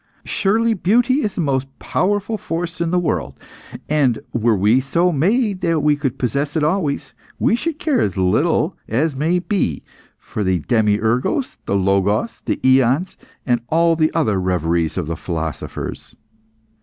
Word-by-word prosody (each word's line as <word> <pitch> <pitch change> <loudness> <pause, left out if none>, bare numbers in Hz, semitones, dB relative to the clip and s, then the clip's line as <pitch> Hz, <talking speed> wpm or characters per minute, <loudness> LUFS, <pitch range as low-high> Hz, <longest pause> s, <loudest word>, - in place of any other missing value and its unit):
Surely 225 +3 +1
beauty 240 +8 +2
is 210 -7 -2
the - - -1
most 135 -3 0
powerful 205 +4 -1
force 170 -3 -4
in 170 - 0
the 180 - +1
world, 175 - -2 0.5
and 140 -6 +2 0.2
were 115 -1 +2
we 105 +7 +3
so 170 +7 +1
made 195 - +1
that 165 -3 +1
we 150 0 +3
could 135 -3 -3
possess 140 +4 -1
it 155 - +1
always, 155 -3 -1 0.2
we - - +2
should 305 +5 -3
care 310 -6 +1
as 95 - -1
little 145 - +1
as 140 +6 0
may 160 +6 +1
be 180 - -1 0.3
for 105 - -5
the 95 -2 +1
demiurgos, 110 - +1
the - - 0
logos, 100 - +1
the - - -1
aeons, 130 +7 +3 0.3
and 120 -3 +1
all 165 +2 +3
the 155 -1 +2
other 110 - +1
reveries 85 -2 0
of 90 - -1
the 80 +2 -3
philosophers. 80 -2 -5
150 Hz, 155 wpm, -19 LUFS, 110-180 Hz, 0.5 s, we